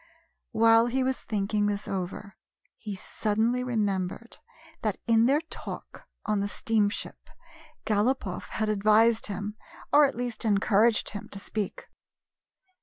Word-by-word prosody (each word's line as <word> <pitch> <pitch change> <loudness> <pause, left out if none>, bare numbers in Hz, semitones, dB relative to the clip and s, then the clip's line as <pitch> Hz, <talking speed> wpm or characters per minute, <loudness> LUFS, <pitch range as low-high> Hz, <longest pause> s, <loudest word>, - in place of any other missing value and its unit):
While 225 +1 +5
he 260 +2 0
was 260 0 -1
thinking 205 0 -1
this 205 0 -2
over, 195 +1 -5 0.4
he 210 -3 -5
suddenly 220 +5 -1
remembered 210 -1 -2 0.4
that 215 -3 -1
in 230 0 +4
their 285 +4 +3
talk 330 - -9 0.2
on 210 -1 +1
the 200 0 -1
steamship 210 -1 -1 0.6
Galopoff 210 -3 0
had 220 - -1
advised 215 +2 +3
him, 205 +1 -5 0.4
or 295 0 +8
at 275 - -2
least 245 -1 -4
encouraged 210 +1 +3
him, 205 - -7
to - - -7
speak. 205 0 -4
215 Hz, 125 wpm, -27 LUFS, 205-235 Hz, 0.6 s, or